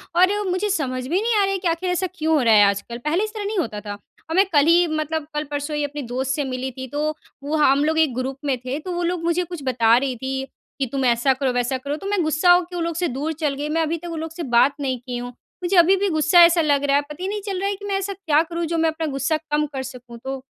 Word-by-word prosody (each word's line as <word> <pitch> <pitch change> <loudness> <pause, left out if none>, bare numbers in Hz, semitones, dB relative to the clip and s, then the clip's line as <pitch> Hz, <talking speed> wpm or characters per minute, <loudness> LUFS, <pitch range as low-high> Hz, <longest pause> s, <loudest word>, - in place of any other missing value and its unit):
और 390 +3 +3
मुझे 370 +3 0
समझ 255 -8 -2
में - - -9
नहीं 460 0 +1
आ - - +4
रही 390 - +1
है - - 0
कि 360 - -2
आख़िर 340 +2 -1
ऐसा 360 +1 0
क्यों 320 -1 +1
हो 295 - +3
रहा 230 -3 +4
है 210 - +7
आजकल, 200 +4 -1
पहले 305 - 0
इस 430 +1 -4
तरह 420 -2 -5
नहीं 420 +1 -2
होता 220 - -2
था। 205 -1 -6 0.4
अब 325 - -2
मैं 385 +2 +5
कल 290 0 +5
ही 345 +1 +5
मतलब 310 0 -2
कल-परसों 295 0 -3
ही 295 - 0
अपने 290 +1 -4
दोस्त 265 +1 -1
से 290 - -1
मिली 260 0 -4
थी 260 +1 -7
तो, 295 +4 -1 0.3
वो 300 +2 -2
हम 285 -1 +4
लोग 320 +1 +1
1 310 -5 +3
ग्रुप 260 +1 -3
में 270 -3 +1
थे, 265 +4 -3
तो 365 +4 -6
वो 350 0 -2
लोग 345 -1 -1
मुझे 340 +1 +1
कुछ 345 -4 -8
बता 235 -2 +4
रही 260 -1 -1
थी 265 +2 -3 0.3
कि 270 - +1
तुम 270 -2 -1
ऐसा 240 +3 +3
करो 265 0 -1
वैसा 245 +1 0
करो 280 +3 -4
तो 390 - -5
मैं 405 -2 +1
गुस्सा 315 +3 +3
होके 355 0 +3
वो 345 - -2
लोग 335 0 -2
से 350 +2 0
दूर 295 +5 -3
चल 295 -3 0
गई, 290 +2 -4
मैं 325 +2 +1
अभी 320 +1 -1
तक 345 +2 -8
उन 325 - -4
लोग 320 0 -5
से 335 0 -6
बात 270 +4 +5
नहीं 260 -3 -2
की 245 -1 -4
हूँ। 245 0 -5 0.3
मुझे 355 +2 0
अभी-भी 380 +3 +5
गुस्सा 335 +3 +5
ऐसा 335 0 +3
लग 285 -2 +2
रहा 280 0 +2
है 285 - +4
पता 300 +4 -9
ही 375 - -1
नहीं 415 0 -3
चल 390 -3 -3
रहा 395 - 0
है 405 - -2
कि 405 +1 -10
मैं 400 -1 -1
ऐसा 390 +1 -3
क्या 320 -6 +2
करूँ, 335 0 -4
जो 335 +1 -2
मैं 325 0 +3
अपना 320 0 -3
गुस्सा 275 +4 0
कम 300 0 +2
कर 265 -1 -3
सकूँ 250 -2 -10
तो, 270 +1 -4
310 Hz, 300 wpm, -22 LUFS, 265-350 Hz, 0.4 s, है